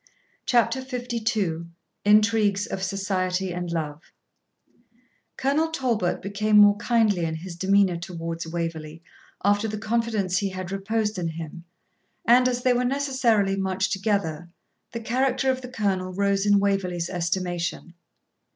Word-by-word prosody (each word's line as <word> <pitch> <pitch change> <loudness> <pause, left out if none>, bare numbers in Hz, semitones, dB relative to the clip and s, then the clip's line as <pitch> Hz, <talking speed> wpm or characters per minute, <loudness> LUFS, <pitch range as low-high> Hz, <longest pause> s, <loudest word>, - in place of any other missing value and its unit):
CHAPTER 245 +2 +2
LII 225 -9 -2 0.4
INTRIGUES 210 -1 +4
OF 190 - -5
SOCIETY 190 -1 -1
AND 175 0 -4
LOVE 155 -2 -3 1.4
Colonel 285 +4 +1
Talbot 240 - -1
became 210 +2 +1
more 205 -1 +8
kindly 215 -5 +2
in 160 -1 -1
his 170 +2 -7
demeanour 190 0 +3
towards 165 -1 -5
Waverley 165 -1 -5 0.4
after 205 +2 +3
the 215 0 -4
confidence 215 -4 0
he 200 - -1
had 185 -1 -6
reposed 210 +1 -1
in 170 - -1
him, 165 +1 -7 0.6
and, 250 +2 +6
as 245 -1 -1
they 255 - +4
were 245 +1 +1
necessarily 250 -7 +1
much 190 -1 -1
together, 190 -5 -1 0.4
the 230 - -5
character 260 +3 +1
of 260 0 -4
the 250 - -8
Colonel 195 -6 -1
rose 200 +1 +1
in 205 0 +5
Waverley's 190 -4 0
estimation. 175 -1 -3
200 Hz, 135 wpm, -25 LUFS, 175-225 Hz, 1.4 s, more